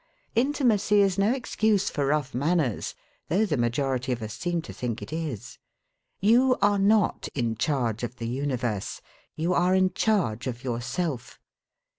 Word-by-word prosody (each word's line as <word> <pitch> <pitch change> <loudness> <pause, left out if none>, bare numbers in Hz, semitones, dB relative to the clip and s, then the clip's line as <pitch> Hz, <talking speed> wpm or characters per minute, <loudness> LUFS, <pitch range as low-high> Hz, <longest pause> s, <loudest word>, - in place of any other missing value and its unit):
Intimacy 235 -6 +2
is 195 -1 +3
no 200 +3 +3
excuse 220 -6 +1
for 140 -2 -1
rough 145 -2 0
manners, 145 - 0 0.3
though 195 +8 +3
the 160 - 0
majority 125 +1 0
of 120 -2 -2
us 110 -1 -5
seem 175 +2 -2
to - - -9
think 120 -2 -3
it - - -8
is. 155 -10 -5 0.6
You 245 +5 +4
are 205 0 +3
not 205 0 +2
in 120 -4 0
charge 120 -3 0
of 120 0 -4
the 115 -3 -5
universe; 125 -5 -2 0.3
you 165 +3 0
are 180 +1 +3
in 185 -1 +3
charge 140 - 0
of 120 -1 -5
yourself. 125 +3 -3
150 Hz, 155 wpm, -26 LUFS, 125-200 Hz, 0.6 s, You